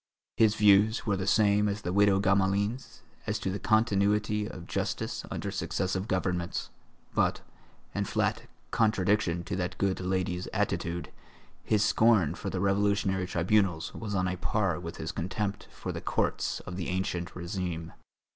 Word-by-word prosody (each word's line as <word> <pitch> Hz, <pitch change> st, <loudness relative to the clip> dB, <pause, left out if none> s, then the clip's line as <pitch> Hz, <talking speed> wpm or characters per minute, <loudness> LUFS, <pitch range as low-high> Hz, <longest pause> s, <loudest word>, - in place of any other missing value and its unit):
His 110 Hz, -2 st, +5 dB
views 105 Hz, +2 st, +4 dB
were 105 Hz, -3 st, +1 dB
the 95 Hz, 0 st, -3 dB
same 105 Hz, -1 st, +4 dB
as 100 Hz, 0 st, -4 dB
the 90 Hz, -, -2 dB
widow 100 Hz, 0 st, +5 dB
Gamelin's 100 Hz, +4 st, 0 dB, 0.2 s
as -, -, 0 dB
to 95 Hz, -, -2 dB
the 100 Hz, -, -3 dB
continuity 105 Hz, -1 st, +2 dB
of 90 Hz, -5 st, -9 dB
justice -, -, -3 dB
under -, -, -4 dB
successive 95 Hz, +2 st, -2 dB
governments; 90 Hz, -3 st, -1 dB, 0.4 s
but, -, -, +1 dB, 0.5 s
in -, -, -1 dB
flat -, -, -1 dB, 0.2 s
contradiction 100 Hz, -5 st, +2 dB
to -, -, -4 dB
that 90 Hz, -1 st, -3 dB
good 100 Hz, -1 st, 0 dB
lady's 90 Hz, -1 st, -1 dB
attitude, 85 Hz, -1 st, -1 dB, 0.5 s
his 105 Hz, -1 st, +2 dB
scorn 110 Hz, -8 st, +4 dB
for 100 Hz, +2 st, -5 dB
the 95 Hz, -, -3 dB
Revolutionary 100 Hz, -1 st, +1 dB
Tribunals 90 Hz, -1 st, +1 dB
was 105 Hz, -3 st, -4 dB
on 95 Hz, -1 st, +1 dB
a 90 Hz, 0 st, -2 dB
par 95 Hz, -1 st, 0 dB
with 85 Hz, -1 st, -7 dB
his 80 Hz, -, -4 dB
contempt 100 Hz, +3 st, -3 dB
for -, -, -6 dB
the -, -, -5 dB
courts -, -, -1 dB
of 90 Hz, -, -7 dB
the 90 Hz, -, -3 dB
ancien 90 Hz, -1 st, -1 dB
régime. 85 Hz, -2 st, -4 dB
95 Hz, 155 wpm, -29 LUFS, 90-105 Hz, 0.5 s, His